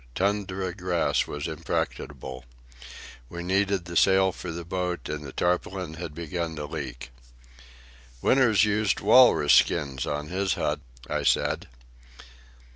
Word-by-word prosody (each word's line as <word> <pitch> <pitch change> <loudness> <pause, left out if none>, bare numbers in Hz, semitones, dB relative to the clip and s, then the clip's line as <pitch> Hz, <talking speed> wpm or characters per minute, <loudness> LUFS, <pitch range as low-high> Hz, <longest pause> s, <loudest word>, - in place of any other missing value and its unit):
Tundra 95 -2 -1
grass 90 -2 0
was 75 +1 -4
impracticable. 65 -4 -4 0.9
We 85 0 -6
needed 95 0 +1
the 85 0 -7
sail 95 +1 +4
for 90 - -8
the 85 0 -6
boat, 90 0 -3
and 75 0 -4
the 70 - -8
tarpaulin 90 0 -1
had 80 -2 -7
begun 85 0 -4
to 75 -1 -5
leak. 65 -5 -6 1.1
"Winters 110 - +4
used 105 -2 +1
walrus 105 - +6
skins 65 0 +2
on 75 +1 -3
his 95 0 0
hut," 75 0 -1 0.3
I - - -1
said. - - +1
85 Hz, 125 wpm, -26 LUFS, 75-95 Hz, 1.1 s, walrus